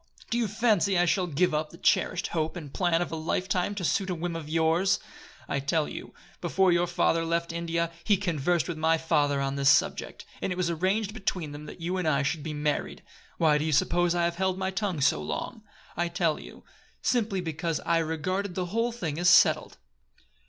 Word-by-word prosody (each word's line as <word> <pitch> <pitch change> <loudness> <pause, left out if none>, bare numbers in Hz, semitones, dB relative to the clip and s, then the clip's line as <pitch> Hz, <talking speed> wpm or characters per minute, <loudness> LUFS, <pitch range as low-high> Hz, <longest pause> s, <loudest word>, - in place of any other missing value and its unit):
Do 235 - +1
you 230 - +1
fancy 205 -3 +2
I 175 - +4
shall 180 +1 +1
give 170 +2 +1
up 150 0 -1
the 170 - -13
cherished 180 +1 +1
hope 160 -1 -2
and 150 -5 -8
plan 175 -2 +2
of - - -8
a - - -2
lifetime 180 +4 -1
to 185 -3 -3
suit 190 +3 0
a 180 - -1
whim 170 +1 -3
of 160 -2 -6
yours? 165 +4 +2 0.5
I 140 - -1
tell 150 +3 0
you, - - -8 0.3
before 190 -1 +2
your 175 0 +2
father 165 -1 +1
left 170 0 -1
India 170 0 -1
he 205 0 +3
conversed 175 -3 0
with 170 -3 -4
my 160 +1 +3
father 150 -3 +1
on 135 0 -2
this 140 0 +4
subject, - - +1 0.2
and - - -1
it - - -1
was 180 -1 0
arranged 195 +5 0
between 185 -8 -3
them 150 +1 -9
that 170 - -10
you 180 +3 -2
and 180 -3 -1
I 140 -2 +2
should 140 +3 -1
be 155 - -5
married. 150 0 -2 0.3
Why 155 -2 +3
do - - -1
you 160 - -1
suppose 175 +4 +2
I 175 - +1
have 170 0 -2
held 190 0 0
my 190 0 -1
tongue 190 -6 -2
so 75 - +3
long? 75 - -4 0.3
I'll 175 0 0
tell 170 -2 0
you. - - -12 0.4
Simply 225 -6 +1
because 165 -1 -2
I 170 0 +2
regarded 175 +4 -2
the 185 - -1
whole 230 +2 +1
thing 165 -10 -4
as 175 0 +4
settled." - - +4
170 Hz, 215 wpm, -27 LUFS, 155-185 Hz, 0.5 s, I